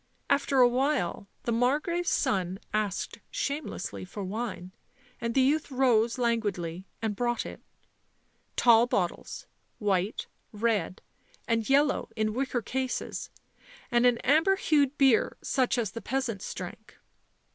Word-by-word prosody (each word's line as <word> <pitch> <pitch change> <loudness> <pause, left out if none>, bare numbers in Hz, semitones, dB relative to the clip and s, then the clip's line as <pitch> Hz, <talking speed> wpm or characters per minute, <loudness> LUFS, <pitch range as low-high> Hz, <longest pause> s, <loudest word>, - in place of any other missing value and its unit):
After 280 -1 +3
a 245 - +8
while 250 - 0 0.2
the 235 - -1
Margrave's 295 +9 +1
son 185 -1 0
asked 210 -3 -2
shamelessly 300 - -3
for 195 +2 -6
wine, 195 -2 -4 0.5
and 230 0 -3
the 265 - +5
youth 295 +3 +2
rose 245 -4 +2
languidly 195 -7 -1 0.2
and 215 -2 -1
brought 240 +2 -1
it; - - -8 0.9
tall 235 0 +6
bottles, 180 -7 -2 0.3
white, 200 -1 0 0.3
red 210 -4 -1 0.4
and 230 -1 0
yellow 285 +1 +3
in 215 -1 0
wicker 250 -1 -1
cases, 260 +2 -3 0.6
and 240 +1 +5
an 245 -1 +3
amber 320 +8 +4
hued 295 -6 +2
beer 265 -5 +4
such 260 -1 +1
as 220 -5 -1
the 230 - -6
peasants 240 -3 -2
drank. 215 +5 -8
235 Hz, 125 wpm, -28 LUFS, 210-270 Hz, 0.9 s, a